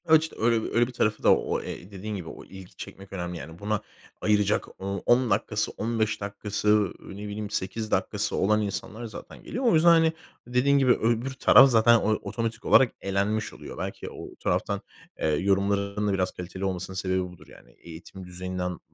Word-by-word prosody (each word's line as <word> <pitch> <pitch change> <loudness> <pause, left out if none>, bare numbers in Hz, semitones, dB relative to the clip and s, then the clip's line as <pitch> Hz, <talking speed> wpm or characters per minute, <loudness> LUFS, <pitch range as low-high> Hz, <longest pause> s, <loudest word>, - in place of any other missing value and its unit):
A, 160 -1 +6
işte 160 +1 +1
öyle 115 0 +1
öyle 120 0 +4
bir 125 - -9
tarafı 105 -3 0
da - - +7
o, - - -2
e 90 +4 -8
dediğin 105 +2 -5
gibi 90 -4 -6
o - - -10
i - - -21
ilgi 95 -1 -12
çekmek 95 0 -10
önemli, 90 -2 -4
yani, 80 +1 -9
buna 105 0 -1 0.4
ayıracak 105 -1 +2
o 100 -1 -3
10 120 0 +4
dakikası - - 0
15 110 -1 -1
dakikası, 100 +1 -4
ııı, 105 -3 +3 0.2
ne 105 +1 -6
bileyim 105 0 -5
8 105 +2 -3
dakikası 105 +2 0
olan 105 +3 +2
insanlar 105 +3 -4
zaten 110 - -10
geliyor. 260 +2 -4
O 235 - +5
yüzden, 165 +1 +6
hani, 165 -1 +5 0.3
dediğin 125 +3 +3
gibi 135 -2 +4
öbür 120 +3 +1
taraf 135 +1 +7
zaten 115 0 +6
o 110 - 0
otomatik 115 +1 -4
olarak 130 -4 +6
elenmiş 100 +3 -1
oluyor. - - -10
Belki - - -5
o - - -10
o - - -16
taraftan, - - -1 0.4
eee, - - 0
yorumların 100 +5 +1
da 100 - +1
biraz 95 -1 0
kaliteli 95 +2 -6
olmasının 95 0 -3
sebebi 95 0 0
budur, 90 -1 -11
yani. - - -17
Eğitim 85 +3 -11
düzeyinden 90 0 -4
105 Hz, 195 wpm, -26 LUFS, 95-115 Hz, 0.4 s, da